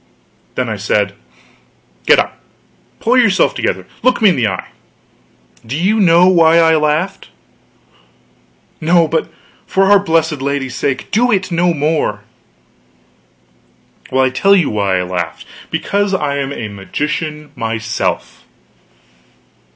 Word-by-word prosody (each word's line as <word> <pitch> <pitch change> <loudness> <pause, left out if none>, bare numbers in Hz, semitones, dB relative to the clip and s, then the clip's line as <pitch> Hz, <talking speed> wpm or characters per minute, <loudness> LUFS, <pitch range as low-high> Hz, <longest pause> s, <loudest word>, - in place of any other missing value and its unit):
Then 125 - -1
I 110 -2 -3
said: 100 0 0 0.9
"Get - - +6
up. - - -1 0.6
Pull 245 +3 +2
yourself 200 -6 +3
together; - - -2 0.2
look 255 0 +2
me 215 -3 +5
in 180 - +2
the 120 -4 +1
eye. 95 - -5 0.9
Do 125 +5 -5
you 200 +7 +1
know 175 -2 +5
why 165 -3 +5
I 165 -1 +4
laughed?" 155 +6 -1 1.5
"No 165 +1 +3
but 160 0 -2 0.4
for 195 +1 +2
our 205 - +7
blessed 160 -6 0
Lady's 135 -2 -2
sake, 130 0 -3
do 245 +3 +2
it 185 -3 0
no 175 +1 +2
more." 150 -9 -1 1.9
"Well, 130 0 +2
I'll 130 - +1
tell 195 +10 +3
you 180 -6 +1
why 100 -3 0
I 90 - -1
laughed. 90 -2 -4 0.2
Because 200 -1 -1
I'm 140 -4 -2
a 115 -6 -5
magician 150 +9 -4
myself." 110 -2 -3
155 Hz, 130 wpm, -15 LUFS, 125-185 Hz, 1.9 s, our